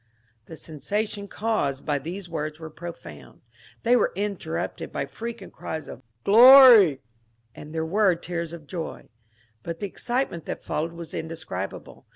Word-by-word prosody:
The 160 - -10
sensation 200 +7 -4
caused 200 -12 -2
by 145 -2 0
these 175 +6 -7
words 155 -2 -4
was 160 -1 -8
profound. 85 - -10 0.4
They 240 +2 +4
were 245 - +2
interrupted 195 - -4
by - - -2
frequent 225 +6 -8
cries 160 -2 -6
of - - -10 0.2
Glory 240 - +9
I 135 - -16 0.3
" 115 0 -42
and 150 - -10
there 160 0 -2
were 190 +2 +3
tears 170 -1 -5
of 170 -3 -10
joy. 165 +2 -7 0.5
But 165 +4 -6
the - - -3
excitement 240 - -3
that - - -5
followed 165 +2 -3
was 170 -1 -8
in 160 - -4
describable. 160 - -7
170 Hz, 160 wpm, -25 LUFS, 155-205 Hz, 0.5 s, Glory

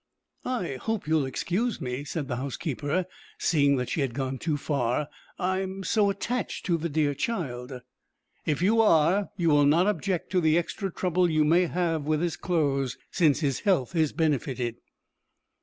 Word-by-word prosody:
"I 180 - -2
hope 220 -7 -2
you 160 - +1
will 150 -4 +2
excuse 195 - -1
me," 125 +1 -4
said 145 0 -4
the 120 - -3
housekeeper, 145 +5 -2 0.3
seeing 145 -4 +3
that 125 -2 -2
she 155 - -1
had 130 -4 -2
gone 135 -1 -2
too 155 -3 -1
far. 140 -1 -1 0.3
"I 185 0 0
am 190 0 -4
so 205 +1 +2
attached 230 +3 -3
to 170 -2 +2
the 170 +2 -2
dear 145 -1 +1
child." 130 - -4 0.6
"If 155 +3 -1
you 225 +4 +4
are, 185 0 +3
you 170 -3 +2
will 145 -1 +5
not 165 +5 +4
object 195 -3 -1
to 185 -1 +2
the 160 0 +3
extra 190 +3 -2
trouble 180 0 +1
you 155 -1 +3
may 170 +3 +4
have 165 -3 -1
with 155 0 +1
his 170 -2 -1
clothes, 140 -7 0
since 155 -3 +3
his 140 -4 0
health 180 -6 +1
is 155 -3 +2
benefited." 130 -6 -1
160 Hz, 175 wpm, -27 LUFS, 140-185 Hz, 0.6 s, will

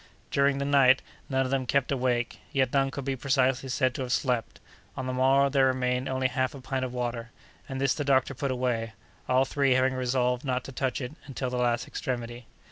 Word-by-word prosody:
During 140 0 +3
the 140 - -2
night 135 -2 +5 0.3
none 135 -1 +1
of 130 - -4
them 135 -2 0
kept 140 +1 +1
awake; 125 -3 0
yet 130 -4 +1
none 135 -1 +3
could 135 -1 -6
be 135 -1 -1
precisely 130 0 +1
said 130 0 +1
to 130 - -5
have 125 -1 -3
slept. 125 -4 -1 0.4
On 130 - -3
the 130 - -2
morrow 135 +2 +4
there 135 -1 +3
remained 125 0 0
only 130 0 +1
half 130 +1 -1
a - - -8
pint 130 0 -3
of 130 - -3
water, 120 -1 -3 0.4
and 135 0 -4
this 135 0 +2
the 145 - -3
doctor 135 0 +2
put 140 +2 -3
away, 125 -3 -1 0.4
all 130 +1 +4
three 135 -1 +2
having 130 +1 +2
resolved 125 -1 0
not 130 -2 -1
to - - -8
touch 130 +1 -2
it 125 0 -4 0.2
until 130 -2 -4
the 125 - -2
last 120 -1 +1
extremity. 120 -1 -5
130 Hz, 215 wpm, -28 LUFS, 125-135 Hz, 0.4 s, night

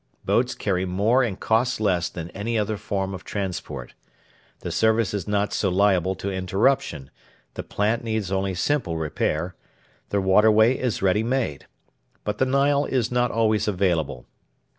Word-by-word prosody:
Boats 125 +1 +1
carry 95 -3 -1
more 100 +8 +2
and 110 -7 -2
cost 120 +2 +1
less 90 -6 +1
than 85 0 -7
any 115 +4 -2
other 105 0 0
form 95 -2 -3
of 90 -3 -7
transport. 90 - -5 0.7
The - - -4
service 110 -1 +2
is 100 -5 -3
not 105 0 0
so 100 - +1
liable 95 -1 +2
to 100 - -4
interruption; 95 - 0 0.4
the - - -5
plant 110 +3 -1
needs 110 -4 -2
only 95 -1 -1
simple 95 - 0
repair; 80 +2 -2 0.6
the 100 - +1
waterway 110 +5 +5
is 125 -7 -2
ready 95 +2 +3
made. 115 - -2 0.6
But 105 0 -3
the 130 - +3
Nile 140 +2 +2
is 125 -3 -1
not 125 0 +2
always 110 -2 +1
available. 90 -10 0
105 Hz, 155 wpm, -24 LUFS, 95-115 Hz, 0.7 s, waterway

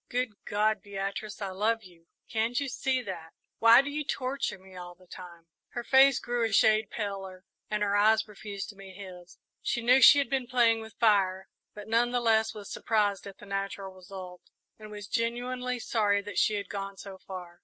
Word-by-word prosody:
"Good 245 -4 -3
God, 210 0 +1
Beatrice, 200 +1 -5
I 195 - -3
love 220 +4 0
you 170 -3 -18 0.2
can't 230 +2 0
you 280 - -2
see 260 0 -1
that? 170 -6 -7 0.3
Why 230 +3 +7
do 285 - -5
you 300 +1 -2
torture 270 -3 -2
me 190 0 -16
all 175 -1 -9
the 185 +1 -21
time?" 175 -2 -12 0.3
Her 240 - -4
face 270 +1 +6
grew 240 -1 -2
a 225 - 0
shade 215 0 +4
paler, 195 -3 -5 0.3
and 210 0 0
her 200 0 +1
eyes 220 +2 +4
refused 205 -1 -7
to 210 - -10
meet 195 -1 -12
his. 180 -2 -11 0.2
She 235 - -2
knew 250 +3 +5
she 285 - +9
had 280 - +2
been 260 -1 -1
playing 235 -3 +3
with 220 -1 -11
fire, 190 -4 +2 0.3
but 210 -1 -9
none 230 +2 +2
the 245 0 0
less 220 -2 +2
was 205 -2 -9
surprised 205 -3 0
at 195 - -10
the - - -13
natural 195 -1 -4
result, 185 -1 -10 0.4
and 215 0 -10
was 210 -1 -8
genuinely 245 +3 -2
sorry 205 -4 +1
that 205 - -3
she 215 - +2
had 200 -2 -4
gone 195 0 -6
so 190 -1 -10
far. 180 -2 -9
210 Hz, 200 wpm, -29 LUFS, 195-235 Hz, 0.4 s, she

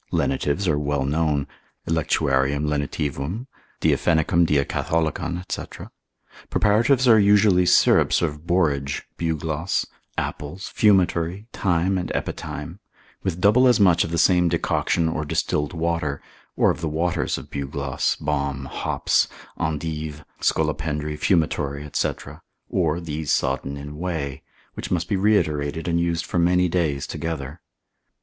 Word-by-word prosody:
Lenitives 90 +7 0
are 75 -3 +2
well 70 -2 -1
known, 75 -1 0 0.4
electuarium 70 -3 +1
lenitivum, 75 - -2 0.4
diaphenicum 85 0 +3
diacatholicon, 80 +4 0
&c. - - -5 0.6
Preparatives 120 +5 +3
are 110 -2 +7
usually 100 -3 +4
syrups - - +4
of 75 0 -3
borage, 75 -6 0
bugloss, 80 +1 -1 0.3
apples, 75 +6 -5
fumitory, 95 -2 +2
thyme 90 +1 +1
and 90 - -4
epithyme, - - -5 0.4
with 90 -3 -2
double 105 +7 +5
as 125 -2 +4
much 90 -4 +5
of - - -4
the 85 - -2
same 90 +1 +4
decoction 85 0 0
or 80 -1 -2
distilled 75 0 -1
water, 85 -4 -1 0.4
or - - +4
of - - -6
the 80 - -1
waters 85 +3 -1
of - - -10
bugloss, 70 -1 -2
balm, 70 -2 -2
hops, - - 0 0.3
endive, 75 -2 -3
scolopendry, 75 -1 -1
fumitory, 75 -4 0
&c. - - +2 0.6
or 85 -3 +1
these 80 -3 -3
sodden 70 +1 0
in 75 +1 -8
whey, 80 -7 -3 0.3
which - - -6
must 85 -1 -1
be 105 - 0
reiterated 80 -7 +1
and 85 0 +1
used 85 -1 0
for 85 - -1
many 90 +1 +3
days 80 -6 0
together. 80 -1 -5
80 Hz, 125 wpm, -23 LUFS, 75-90 Hz, 0.6 s, are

